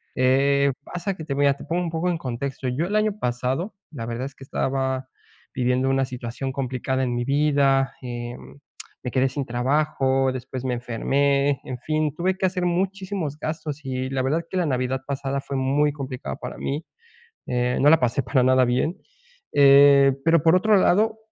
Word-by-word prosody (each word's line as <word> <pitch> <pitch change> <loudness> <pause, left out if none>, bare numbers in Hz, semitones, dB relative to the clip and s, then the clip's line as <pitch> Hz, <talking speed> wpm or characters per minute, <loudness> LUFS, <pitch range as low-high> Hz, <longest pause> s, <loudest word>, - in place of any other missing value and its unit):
Eh, 140 +2 +3
pasa 180 +4 -4
que 160 - -8
te 145 - -3
voy 140 +1 +2
a 140 - +5
te 140 - -12
pongo 175 +2 -1
un 175 - -2
poco 165 +2 -1
en 175 - 0
contexto, 135 -1 -4
yo 130 +7 -1
el 205 - -2
año 215 -1 +1
pasado, 130 - -2 0.2
la 115 -7 -6
verdad 120 +2 -4
es 140 0 -8
que - - -13
estaba 130 -1 -2 0.5
viviendo 125 +1 +1
una 135 0 +2
situación 125 +1 -5
complicada 130 0 -2
en 120 -1 -1
mi 120 - -1
vida, 140 -1 +2
eh, 120 -1 -5 0.7
me 125 - -4
quedé 130 0 +2
sin 135 +1 -4
trabajo, 135 +1 +1
después 130 0 -6
me 125 - 0
enfermé, 140 +3 +1
en 130 - -6
fin, 155 +3 -1
tuve 185 +3 0
que 190 - 0
hacer 180 -1 0
muchísimos 185 -3 -2
gastos 150 -2 -5
y 130 0 -3
la 135 -1 -1
verdad 150 +6 0
que 190 - -3
la 180 - +1
Navidad 130 -2 -1
pasada 140 0 -2
fue 140 - -6
muy 140 +3 +2
complicada 130 - -5
para - - -8
mí. 145 +4 -3 0.6
Eh 125 0 0
no 145 - +5
la 160 - +7
pasé 125 +1 0
para 130 +1 +1
nada 130 0 +4
bien, 130 +9 0 0.6
eh, 140 -1 +7
pero 165 -2 +4
por 165 +1 +5
otro 215 +3 +4
lado, 215 +4 +3
135 Hz, 190 wpm, -24 LUFS, 130-155 Hz, 0.7 s, la